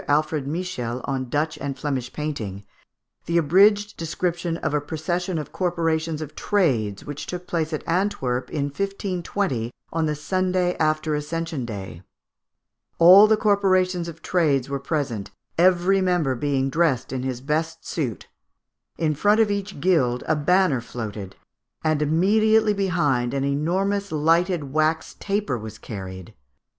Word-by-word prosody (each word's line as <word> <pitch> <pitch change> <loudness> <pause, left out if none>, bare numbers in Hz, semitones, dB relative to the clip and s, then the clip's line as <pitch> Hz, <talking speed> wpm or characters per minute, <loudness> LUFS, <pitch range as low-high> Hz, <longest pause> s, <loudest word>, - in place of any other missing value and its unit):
Alfred 150 -1 +1
Michiels 145 -7 -3
on 130 -2 -3
Dutch 155 +4 -1
and 140 -1 -4
Flemish 130 -3 -3
painting, 110 -11 -4 0.6
the 170 - +1
abridged 205 +6 +4
description 170 +1 -2
of 155 - -2
a 150 - +1
procession 170 +4 -2
of 150 - -5
corporations 165 -3 -1
of 150 - -10
trades, 120 - 0
which 145 0 -6
took 180 0 -5
place 165 -2 -2
at 155 - -3
Antwerp 165 -9 0
in 145 - -2
1520, 180 - -2 0.2
on 160 -1 +1
the 150 - -1
Sunday 185 +3 0
after 155 0 +1
Ascension 150 -2 -3
Day. 95 -6 -7 1.0
"All 185 +5 +9
the 220 0 +4
corporations 185 -4 +2
of 165 -1 -9
trades 145 -8 +1
were 140 0 -2
present, 135 -8 -2 0.3
every 185 +2 +4
member 175 -7 +1
being 135 +1 0
dressed 145 -6 +1
in 130 - -2
his 130 -1 -3
best 160 +4 -2
suit." 130 -10 -3 0.7
In 155 -2 +1
front 205 +9 +3
of 220 -2 +3
each 200 -4 -3
guild 135 -8 +2
a 155 - +3
banner 160 -3 +2
floated; 105 -5 -6 0.5
and 155 -1 +1
immediately 210 +7 +3
behind 150 -11 0
an 135 - 0
enormous 185 +8 0
lighted 165 -1 +1
wax 155 +1 0
taper 200 - -1
was 110 0 -8
carried. 95 -4 -8
155 Hz, 140 wpm, -23 LUFS, 135-180 Hz, 1.0 s, All